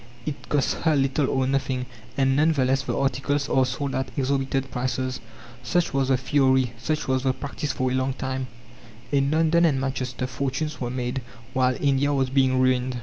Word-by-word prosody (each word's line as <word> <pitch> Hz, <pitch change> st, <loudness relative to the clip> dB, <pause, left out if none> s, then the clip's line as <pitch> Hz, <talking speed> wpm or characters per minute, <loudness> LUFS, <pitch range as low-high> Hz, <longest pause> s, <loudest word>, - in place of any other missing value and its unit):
It 150 Hz, -2 st, -6 dB
costs 145 Hz, -2 st, +2 dB
her 160 Hz, -2 st, +1 dB
little 135 Hz, +1 st, +1 dB
or 130 Hz, -1 st, +1 dB
nothing, 130 Hz, -1 st, -1 dB, 0.3 s
and 135 Hz, -1 st, +3 dB
none 155 Hz, +3 st, +4 dB
the 135 Hz, -4 st, +1 dB
less 135 Hz, +1 st, +2 dB
the 135 Hz, -, -3 dB
articles 140 Hz, +1 st, 0 dB
are 130 Hz, -1 st, +3 dB
sold 140 Hz, +2 st, -3 dB
at 130 Hz, -, -2 dB
exorbitant 135 Hz, -1 st, 0 dB
prices. 130 Hz, +1 st, -2 dB, 0.4 s
Such 170 Hz, +6 st, 0 dB
was 135 Hz, -1 st, +1 dB
the 130 Hz, -1 st, +3 dB
theory 130 Hz, -2 st, +2 dB
such 155 Hz, +6 st, -2 dB
was 130 Hz, 0 st, +1 dB
the 130 Hz, 0 st, +1 dB
practice 140 Hz, +2 st, -4 dB
for 130 Hz, +2 st, -1 dB
a -, -, -1 dB
long 130 Hz, +1 st, 0 dB
time. 130 Hz, 0 st, -3 dB, 0.6 s
In 140 Hz, -1 st, +2 dB
London 160 Hz, +2 st, +3 dB
and 150 Hz, -6 st, +3 dB
Manchester 130 Hz, -2 st, -2 dB
fortunes 135 Hz, +4 st, -3 dB
were 120 Hz, -, -1 dB
made, 125 Hz, +1 st, -2 dB, 0.3 s
while 130 Hz, -1 st, +2 dB
India 140 Hz, 0 st, +2 dB
was 130 Hz, -1 st, 0 dB
being 130 Hz, -1 st, +3 dB
ruined. 130 Hz, -1 st, +2 dB
135 Hz, 190 wpm, -25 LUFS, 130-140 Hz, 0.6 s, none